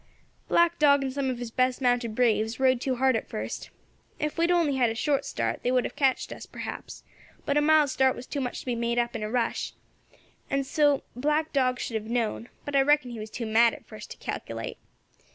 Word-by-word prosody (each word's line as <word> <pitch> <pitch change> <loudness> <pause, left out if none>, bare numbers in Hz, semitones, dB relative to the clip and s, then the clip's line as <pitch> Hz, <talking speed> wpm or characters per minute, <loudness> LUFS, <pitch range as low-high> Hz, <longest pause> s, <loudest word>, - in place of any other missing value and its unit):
"Black 340 0 +3
Dog 285 -2 +5
and 265 -1 -3
some 275 -1 -1
of 255 - -2
his 240 -1 -6
best 255 +1 +1
mounted 245 -3 +1
braves 225 -1 +1
rode 260 -2 +3
too 260 -1 0
hard 260 0 +3
at - - -3
first. - - -5 0.5
Ef 300 -1 -2
we 335 - +2
had - - 0
only 335 -6 +2
had 245 -3 +3
a 225 - -3
short 280 +4 0
start 115 0 -2
they 245 - 0
would 255 -1 +3
have - - -5
catched 270 -3 +1
us, - - -10
perhaps; - - -7 0.4
but 280 - 0
a 295 - +4
mile's 305 -2 +4
start 265 0 +3
was 245 - -8
too 280 - -3
much 250 -1 -3
to - - -15
be 250 - -1
made 235 0 -1
up 240 0 +1
by 230 - -3
a 215 0 -3
rush, 240 0 -1 0.8
and 275 0 0
so 290 0 +2
Black 300 +5 0
Dog 255 -3 +2
should - - -4
have 220 - -11
known; 235 0 -1 0.2
but 290 - -4
I 275 - +6
reckon 290 -2 +3
he 235 - -7
was 215 +1 -6
too 230 +1 -5
mad 225 +1 +4
at - - -15
first - - -10
to - - -9
calculate. - - -5
255 Hz, 235 wpm, -27 LUFS, 235-285 Hz, 0.8 s, I